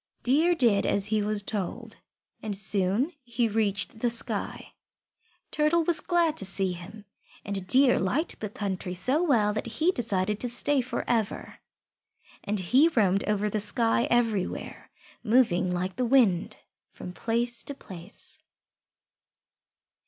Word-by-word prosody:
Deer 315 +8 +3
did 230 -9 +2
as 200 -1 +1
he 215 0 0
was 210 0 0
told, 200 -3 -5 0.4
and 210 -3 -3
soon 200 - +1
he 240 -1 -1
reached 210 0 -1
the 240 - +1
sky. 230 - -2 0.8
Turtle 305 +3 +2
was 335 0 +2
glad 340 -3 +1
to - - -1
see 195 -1 +1
him, 185 +5 -11 0.4
and 195 -2 -4
Deer 260 +2 +4
liked 255 - -1
the 210 - -4
country 190 -3 -4
so 260 - +3
well 230 -11 +2
that 215 - -4
he 315 +10 +1
decided 210 - -1
to 245 - -1
stay 270 +3 +1
for 255 +1 -5
ever. 225 -3 -2 0.8
And 205 0 -2
he 255 - +4
roamed 200 - +1
over 210 0 0
the 210 0 -2
sky 225 +3 +2
everywhere, 230 -6 -1 0.3
moving 210 -7 +2
like 180 +1 -3
the 250 - 0
wind 230 -9 +2 0.3
from 180 - -9
place 235 +3 -1
to 285 - -5
place. 185 -5 -6
215 Hz, 140 wpm, -27 LUFS, 195-250 Hz, 0.8 s, Deer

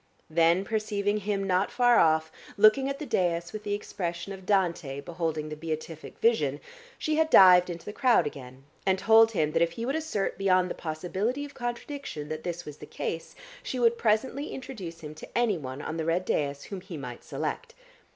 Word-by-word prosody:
Then 170 +4 +3
perceiving 210 -1 -1
him 205 -1 -2
not 185 0 +1
far 245 -1 +4
off, 160 0 +3 0.3
looking 215 +6 +5
at 275 - -3
the 300 - -6
dais 175 -7 0
with 215 - -5
the 205 -1 -1
expression 175 -2 -5
of 190 -1 -11
Dante 170 -8 0
beholding 160 -1 -3
the 155 - -5
Beatific 155 0 -6
vision, 150 - +2 0.4
she 310 0 -1
had 320 0 +3
dived 180 - +8
into 170 -1 -7
the 210 - -6
crowd 240 -10 +3
again, 130 -2 -8 0.2
and 190 0 +2
told 225 +3 +5
him 155 -6 +1
that 165 +1 +1
if 170 0 +2
he 230 +6 -4
would 270 +4 -1
assert 310 -14 -2
beyond 185 -2 +3
the - - -1
possibility 185 - -3
of 285 - -11
contradiction 240 - -5
that 155 0 -4
this 175 0 -4
was 150 -1 -9
the - - -11
case, 165 - -5 0.3
she 260 - -4
would 235 -1 +3
presently 250 +7 +1
introduce 200 -11 -7
him 150 -1 -7
to 155 - -8
anyone 155 - -1
on 160 - -4
the 160 - -2
red 170 +3 0
dais 140 -4 -1
whom 195 -2 -7
he 180 -3 -8
might 125 -4 -8
select. - - -4
185 Hz, 195 wpm, -28 LUFS, 160-220 Hz, 0.4 s, dived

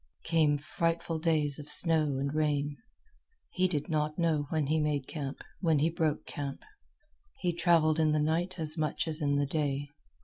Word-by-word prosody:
Came 155 -3 +2
frightful 165 +2 -2
days 155 -3 0
of 150 - -8
snow 155 -5 +6
and 140 +1 -3
rain. 145 -1 -1 0.8
He 185 0 +1
did 150 -5 -3
not 150 -2 -2
know 160 -4 0
when 155 -2 -1
he 155 +3 0
made 150 -3 -1
camp, 140 -4 -6 0.2
when 165 -4 +2
he 155 +4 +1
broke 160 -2 -1
camp. 140 -2 -6 0.7
He 175 -2 -1
travelled 165 -2 +2
in 155 -1 +2
the 150 - +1
night 170 +5 -1
as 155 -1 +4
much 155 +2 -2
as 155 0 -2
in 145 -1 +1
the 145 0 +1
day. 145 -1 -2
155 Hz, 175 wpm, -29 LUFS, 145-165 Hz, 0.8 s, snow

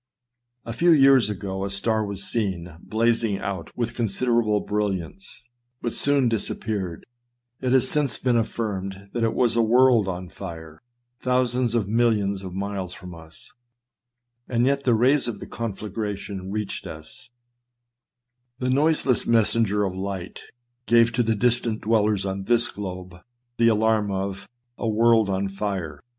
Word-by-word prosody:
A 115 - -5
few 170 +9 +2
years 135 -7 +6
ago 95 -1 -4
a 100 - -2
star 110 +3 +1
was 100 -1 -4
seen 95 -6 -2
blazing 115 -2 +1
out 95 -4 -5
with 120 -1 -1
considera 120 +1 +1
ble 105 -1 +1
brilliance, 105 - -3 0.4
but 120 - -3
soon 140 -3 +2
disappeared; 105 -5 -2 0.6
it 130 -1 0
has 130 0 +4
since 145 -1 +1
been 125 -2 +1
affirmed 100 -4 -3
that 120 - -1
it 115 - +1
was 120 -2 +2
a 115 - +4
world 120 -2 +4
on 90 -1 -4
fire, 80 -5 -9 0.4
thousands 125 -1 +1
of 110 -5 +1
mil 120 +3 +3
lions 100 -3 -1
of 95 -1 -7
miles 95 -2 -4
from 90 -3 -10
us, 80 -1 -13 1.0
and 120 0 +2
yet 140 +1 +1
the 120 -3 +4
rays 130 +4 +3
of 115 -4 -3
the - - -7
confla 105 -3 -5
gration 100 -3 -4
reached 105 -1 -4
us; 80 +10 -10 1.3
the 130 0 -1
noiseless 140 -2 +2
messenger 110 -2 +2
of 95 -2 -1
light 95 -1 -5 0.4
gave 115 0 +5
to 120 +2 +1
the 115 -1 +1
distant 115 0 0
dwellers 105 -2 +1
on 95 0 -3
this 120 +2 +2
globe 90 -3 -7 0.4
the 115 - +4
alarm 110 -1 +2
of 95 0 -4
" 120 - -51
A 115 - -1
world 110 -1 +4
on 95 +1 0
fire 95 -6 -4
110 Hz, 155 wpm, -24 LUFS, 95-120 Hz, 1.3 s, years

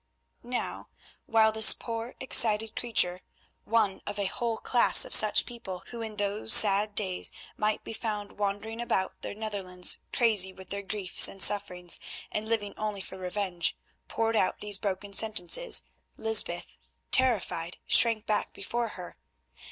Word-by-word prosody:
'" - - -48
Now, 245 +1 -4 0.4
while 220 -1 +4
this 220 0 +5
poor 230 +1 -6
excited 220 -4 +3
creature, 185 -6 +1 0.4
one 215 -4 +1
of 205 - -3
a 200 - -1
whole 230 +3 -2
class 240 +1 +4
of - - -5
such 215 -1 +6
people 210 -7 -8
who 235 -1 -6
in 220 -1 -5
those 205 +1 -1
sad 205 0 +5
days 190 -4 -1 0.2
might 215 0 -1
be - - -7
found 210 -3 -4
wandering 205 +3 -2
about 190 -5 -2
the - - -6
Netherlands 195 -4 -2
crazy 210 -6 +2
with 190 -1 -14
their 200 0 -3
griefs 195 -1 +1
and 195 - -11
sufferings, 180 -3 +2 0.3
and 215 +1 -3
living 205 -3 -1
only 210 -2 -3
for 190 - -8
revenge, 180 -2 -2 0.3
poured 225 0 -1
out 190 - +1
these 205 -2 -2
broken 200 0 -4
sentences, 220 - +1 0.3
Lysbeth, 220 -6 -1 0.3
terrified, 205 -9 +1
shrank 230 -2 +4
back 210 -2 -1
before 235 +4 -3
her. - - -9
210 Hz, 150 wpm, -28 LUFS, 195-225 Hz, 0.4 s, such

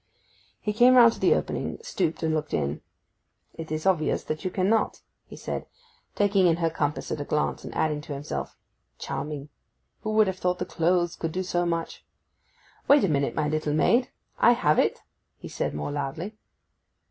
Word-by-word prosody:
He 210 - -2
came 245 +4 +6
round 235 -2 +8
to - - -11
the - - +4
opening, - - -3
stooped, 175 - -2
and 160 -1 +1
looked 155 -1 -1
in. 70 +2 -2 0.7
'It 160 -1 -8
is 155 +2 -3
obvious 175 -5 +1
that 155 0 -4
you 185 - -1
cannot,' 195 +4 +1 0.3
he - - -11
said, - - -5 0.5
taking 200 -2 +3
in 165 - +4
her 165 -1 0
compass 150 -2 -2
at 145 - -2
a - - -1
glance; 150 +1 -1
and - - -7
adding 150 -1 0
to 150 - -7
himself; 145 +2 -5 0.4
'Charming! 140 +1 -5 0.5
who 215 - -4
would 215 0 +5
have 190 -1 -3
thought 180 0 0
that - - -5
clothes 175 0 +1
could 165 - -3
do 185 +3 -2
so 175 -1 0
much!—Wait 170 - -2
a 195 - +2
minute, 140 -2 0
my 150 - 0
little 155 -1 -1
maid: 240 +10 +3 0.3
I 240 - +6
have 155 -11 +2
it!' - - +1 0.3
he - - -9
said - - -3
more 75 - -3
loudly. 145 +8 -4
165 Hz, 180 wpm, -26 LUFS, 150-190 Hz, 0.7 s, round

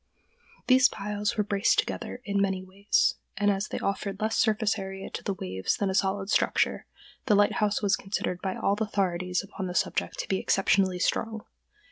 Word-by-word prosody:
These 260 0 +6
piles 205 +1 -3
were 210 - +3
braced 200 +1 +2
together 250 - -2
in 200 -1 0
many 190 -1 0
ways, 195 +2 +1 0.2
and, 205 0 +3
as 195 +1 -1
they - - -4
offered 200 0 -3
less 220 +1 0
surface 220 -1 +2
to 195 -2 -5
the 200 - -2
waves 95 - -2
than 200 -2 0
a - - -2
solid 195 +1 0
structure, - - +1 0.4
the 210 - +5
lighthouse 205 +1 +2
was 200 -1 +3
considered 180 -2 -3
by 190 -1 -2
all 200 - +1
authorities 185 -4 0
upon 195 -1 -6
the 180 - -5
subject - - 0
to - - -4
be 190 - 0
exceptionally 195 -1 +2
strong. 220 +4 -1
200 Hz, 175 wpm, -27 LUFS, 190-210 Hz, 0.4 s, These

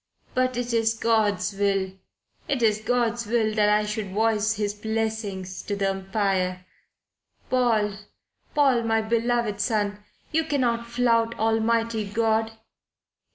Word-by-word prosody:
"But 255 -1 +1
it 245 -1 -2
is 225 0 +2
God's 210 -4 +1
will. 195 -1 0 0.6
It 275 -6 0
is 215 -1 +3
God's 235 0 0
will 220 -1 +1
that 210 -1 +3
I 210 0 +3
should 210 -1 -3
voice 220 0 +2
His 205 0 -3
message 215 -5 -3
to 205 - -1
the 195 -1 0
Empire. 190 -2 -1 0.9
Paul, 220 -5 +2 0.6
Paul, 270 -5 +4
my 225 -1 +1
beloved 230 -2 0
son 205 -2 -1 0.3
you 320 +1 +2
cannot 240 -6 0
flout 235 -1 +1
Almighty 225 0 +1
God." 220 +1 +1
220 Hz, 125 wpm, -25 LUFS, 205-235 Hz, 0.9 s, Paul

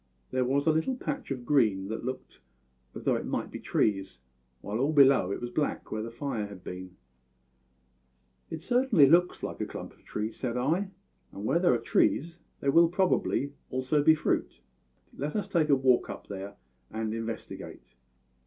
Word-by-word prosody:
There 130 0 +1
was 140 +3 +1
a 160 - +5
little 160 +12 0
patch 155 - -4
of 130 -3 -4
green 110 -9 +2
that 110 - -4
looked 130 - -6 0.6
as - - -7
though - - +2
it - - -2
might - - -3
be - - -6
trees, 95 - 0 0.4
while 105 +3 -3
all 140 +4 +2
below 135 -9 +6
it - - -2
was 120 0 -5
black, 150 +3 -2
where 110 - -2
the 115 - -5
fire 115 -3 -3
had 100 -3 -11
been. 90 0 -8 1.6
"`It 160 - -5
certainly 245 - +4
looks 175 +4 +4
very - - -4
like - - -9
a - - -2
clump - - -8
of - - -26
trees,' 110 +1 -4
said 125 -2 -2
I; 165 +10 0 0.4
`and 100 - -8
where 165 +10 +2
there 175 -8 +4
are - - +2
trees 165 +8 +1 0.2
there 140 - +2
will 170 +4 +7
also 170 +1 -4
probably 145 -6 +1 0.5
be 160 +1 +7
fruit. 155 - -1 0.6
Let 145 +3 -4
us 210 - -1
take 160 -3 +1
a 140 - +6
walk 130 -4 +3
up 100 - -7
there 100 0 -7 0.3
and 110 0 -3
investigate.' 115 0 -7
130 Hz, 185 wpm, -29 LUFS, 110-155 Hz, 1.6 s, will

